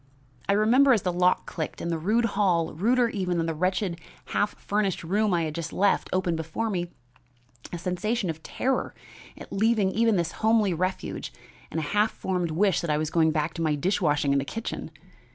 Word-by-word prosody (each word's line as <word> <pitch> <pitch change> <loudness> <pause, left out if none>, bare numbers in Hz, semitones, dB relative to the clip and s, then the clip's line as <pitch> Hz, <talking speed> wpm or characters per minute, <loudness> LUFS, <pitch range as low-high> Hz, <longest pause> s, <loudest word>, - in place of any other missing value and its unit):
I - - +5
remember, 245 +7 +5
as 220 - +1
the 180 - 0
lock 180 +1 +2
clicked 160 -3 -5
and 170 - -3
the 165 - 0
rude 220 +8 +2
hall, 180 -5 +1
ruder 240 +8 +2
even 185 -5 -1
than 165 - 0
the 165 - -1
wretched 180 +1 -1 0.3
half 205 - -1
furnished 200 -4 -1
room 205 +5 +1
I 170 -2 +2
had 155 -1 -3
just 165 0 -4
left, 200 +1 +1
opened 185 -3 0
before 165 +8 -3
me, 175 -2 -2 0.8
a 175 - -4
sensation 185 +5 -1
of 160 -1 -4
terror 260 +9 -2 0.4
at - - -10
leaving 210 -2 +2
even 225 +1 +2
this 170 -3 0
homely 220 -3 +3
refuge 185 +3 -3 0.4
and 160 - -3
a - - -2
half 210 +8 +2
formed 180 -3 -2
wish 190 +4 +2
that 170 - -4
I 150 - +2
was 155 0 -2
going 160 -1 +3
back 155 0 -1
to 165 - -5
my 155 -2 +1
dish 185 +8 0
washing 145 -3 +2
in 140 - +3
the - - -1
kitchen. 225 +10 -5
180 Hz, 205 wpm, -26 LUFS, 165-210 Hz, 0.8 s, I